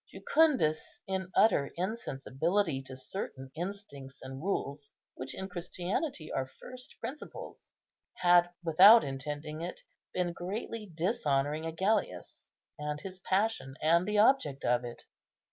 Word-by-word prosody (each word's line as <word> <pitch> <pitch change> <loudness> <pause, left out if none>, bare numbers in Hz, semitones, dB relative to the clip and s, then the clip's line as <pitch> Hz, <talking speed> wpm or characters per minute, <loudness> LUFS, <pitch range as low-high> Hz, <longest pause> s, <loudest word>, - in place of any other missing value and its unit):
Jucundus, 260 - +2
in 190 -1 -3
utter 180 -10 +4
insensibility 170 - -1
to 130 - -8
certain 130 -2 -6
instincts 165 -7 -7
and 130 +1 -7
rules 145 -6 -3 0.2
which 130 +1 -6
in 190 - -4
Christianity 180 - -3
are 130 -1 -1
first 250 0 -8
principles, 295 +4 -8 0.4
had, 175 -1 +5
without 190 +8 +8
intending 145 +3 -5
it, 175 +2 -5 0.3
been 180 -1 -1
greatly 205 +3 -5
dishonouring 155 - 0
Agellius, 190 +6 -1 0.3
and 150 0 -3
his 185 -1 -8
passion, 190 -8 0
and 170 +4 +3
the 210 0 +1
object 205 - +3
of 125 0 +2
it. 120 -1 -8
170 Hz, 120 wpm, -31 LUFS, 140-200 Hz, 0.4 s, without